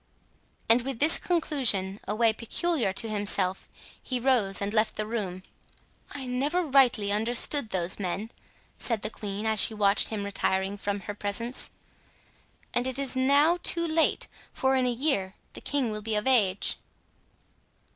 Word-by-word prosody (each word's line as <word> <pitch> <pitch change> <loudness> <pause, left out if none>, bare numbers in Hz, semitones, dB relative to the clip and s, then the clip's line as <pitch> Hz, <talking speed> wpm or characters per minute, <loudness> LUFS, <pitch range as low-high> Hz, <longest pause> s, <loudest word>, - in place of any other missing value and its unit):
And 230 +2 +4
with 265 0 -5
this 300 +6 +5
conclusion—a 215 - +1
way 225 0 +2
peculiar 240 - -1
to 225 +4 -1
himself—he 205 +4 -2
rose 235 -6 +2
and 200 +1 -2
left 215 0 +1
the 215 - -2
room. 195 -5 -5 0.7
"I 275 -2 -7
never 280 +8 -1
rightly 255 -8 +3
understood 230 +4 +1
those 180 0 0
men," 200 +4 -4 0.5
said 225 -4 -1
the 215 - -3
queen, 205 0 -6
as 220 -1 +2
she 220 - +5
watched 200 -1 +4
him 215 -2 -4
retiring 195 0 -1
from 200 0 -4
her 205 +2 -6
presence; 210 +5 -4 1.0
"and 245 +1 +1
it 260 0 -3
is 275 -2 -1
now 285 +6 +3
too 335 -1 +2
late, 320 0 0 0.2
for 265 0 0
in 255 -1 +1
a - - +1
year 230 -7 -1 0.2
the - - -9
king 275 -6 -1
will 215 0 -6
be 220 0 -3
of 210 - -1
age." 205 -8 +2
225 Hz, 155 wpm, -27 LUFS, 200-265 Hz, 1.0 s, this